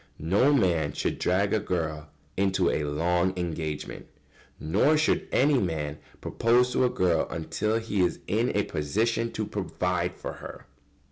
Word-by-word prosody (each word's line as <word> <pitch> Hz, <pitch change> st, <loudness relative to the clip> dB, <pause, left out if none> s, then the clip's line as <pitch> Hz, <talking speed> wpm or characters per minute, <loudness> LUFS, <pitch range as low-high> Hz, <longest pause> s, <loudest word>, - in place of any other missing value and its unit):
] -, -, -36 dB, 0.2 s
No 130 Hz, +7 st, +5 dB
man 85 Hz, -, +2 dB
should -, -, -2 dB
drag 100 Hz, +3 st, +1 dB
a 110 Hz, -, +3 dB
girl 80 Hz, -6 st, -3 dB, 0.3 s
into 95 Hz, -2 st, +2 dB
a 75 Hz, -, -1 dB
long 85 Hz, +5 st, 0 dB
engagement. 80 Hz, -4 st, -4 dB, 0.5 s
Nor 105 Hz, -, +2 dB
should 155 Hz, -, +1 dB
any 140 Hz, 0 st, +3 dB
man 80 Hz, -6 st, -3 dB, 0.2 s
propose 125 Hz, +2 st, +2 dB
to 130 Hz, -, +3 dB
a -, -, +3 dB
girl 85 Hz, -7 st, +1 dB
until 105 Hz, +7 st, -1 dB
he 110 Hz, -4 st, -1 dB
is 90 Hz, -, +1 dB
in -, -, +1 dB
a -, -, +2 dB
position 115 Hz, +10 st, -1 dB
to 110 Hz, -, -2 dB
provide 90 Hz, -2 st, -2 dB
for -, -, -6 dB
her. -, -, -9 dB
90 Hz, 155 wpm, -27 LUFS, 80-110 Hz, 0.5 s, No